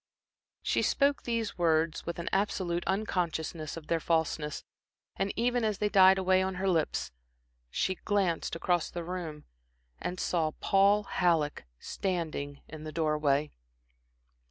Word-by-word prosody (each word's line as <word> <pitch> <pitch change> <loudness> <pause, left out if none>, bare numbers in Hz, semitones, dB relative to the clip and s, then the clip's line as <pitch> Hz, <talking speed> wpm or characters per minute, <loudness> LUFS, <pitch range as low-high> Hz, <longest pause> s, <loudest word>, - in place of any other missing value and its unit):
She - - +1
spoke 280 0 +2
these 230 -5 -2
words 160 -1 +1
with 170 - -3
an 170 - -5
absolute 185 -3 0
unconsciousness 170 -6 -2
of 160 - -8
their 165 +1 0
falseness; 160 -2 -1 0.5
and 195 - -1
even 245 +1 +1
as 215 -2 0
they 210 +1 0
died 190 -1 +7
away 185 0 +3
on 190 0 -1
her 190 +2 -1
lips, 165 - 0 0.6
she 190 - 0
glanced 190 -4 0
across 175 0 0
the 175 - -5
room 165 -4 -5 0.6
and 180 +1 -4
saw 160 -3 0
Paul 200 +2 +4
Halleck 165 - +1
standing 155 - -3
in 155 0 -9
the 155 - -6
door 155 -1 +1
way. 150 0 +1
175 Hz, 140 wpm, -30 LUFS, 160-195 Hz, 0.6 s, died